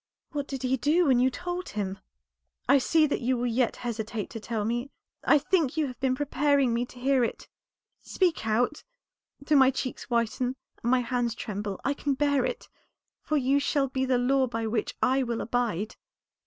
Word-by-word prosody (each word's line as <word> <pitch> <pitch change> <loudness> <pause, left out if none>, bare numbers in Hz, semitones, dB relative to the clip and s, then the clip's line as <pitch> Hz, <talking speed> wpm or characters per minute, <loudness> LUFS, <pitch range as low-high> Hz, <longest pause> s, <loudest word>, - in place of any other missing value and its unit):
"What 290 -2 -3
did 270 -2 -5
he 260 +1 +1
do 305 +8 +3
when 260 -4 +4
you 255 +1 +4
told 355 +6 -5
him? 195 -2 -3 0.7
I 280 - +6
see 315 +4 +3
that 290 - -1
you 250 +1 +1
will 240 - -1
yet 240 0 +1
hesitate 225 -2 -4
to 225 - -6
tell 220 -1 -3
me. 240 +4 -2 0.3
I - - +5
think 315 -1 +1
you 310 - +2
have 250 -3 -7
been 265 -1 +1
preparing 280 -2 +2
me 240 +1 0
to 250 - -15
hear 265 0 +3
it. 230 - -3 0.5
Speak 350 - 0
out. 240 +7 +1 0.6
Though 295 +1 +2
my 265 -1 +7
cheeks 265 -1 -4
whiten 245 +2 0 0.3
and 235 - -1
my 255 0 +4
hands 240 -1 -1
tremble 205 -3 -4
I 280 - +2
can 280 -1 -1
bear 285 -1 +2
it, - - -3 0.5
for 305 - 0
you 275 +1 +2
shall 280 -1 +1
be 260 0 -1
the 260 -1 +2
law 260 +2 +2
by 230 -1 -3
which 220 -1 -2
I 265 +1 +3
will 235 -3 -2
abide." 225 -4 -2
255 Hz, 195 wpm, -27 LUFS, 235-280 Hz, 0.7 s, my